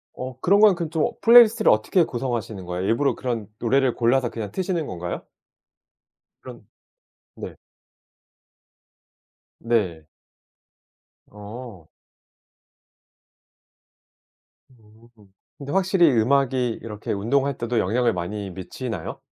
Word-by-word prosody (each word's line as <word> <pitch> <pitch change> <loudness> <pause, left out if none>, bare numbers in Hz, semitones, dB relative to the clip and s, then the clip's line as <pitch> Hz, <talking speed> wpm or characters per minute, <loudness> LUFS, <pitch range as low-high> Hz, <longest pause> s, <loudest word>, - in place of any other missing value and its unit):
어 130 0 -7
그런 200 +3 +4
건 210 -3 +6
그 170 -2 -4
좀 160 +8 0
플레이리스트를 230 -1 +7
어떻게 110 - +2
구성하시는 120 - -4
거예요? 90 +1 -4
일부러 115 +7 +1
그런 115 -6 -4
노래를 130 +1 +1
골라서 120 +1 +1
그냥 110 -4 -6
트시는 175 - -2
건가요? 85 0 -6 1.2
그런 - - -12 0.7
네. - - -8 2.1
네. 95 -9 0 1.3
어. 105 -3 -10 2.8
음, 110 -1 -22 0.5
근데 140 0 -7
확실히 190 -3 +3
음악이 125 0 +1
이렇게 105 -2 -6
운동할 135 +7 0
때도 120 0 -1
영향을 115 +4 +1
많이 100 +3 -5
미치나요? 95 +1 -6
120 Hz, 230 characters per minute, -23 LUFS, 105-140 Hz, 2.8 s, 플레이리스트를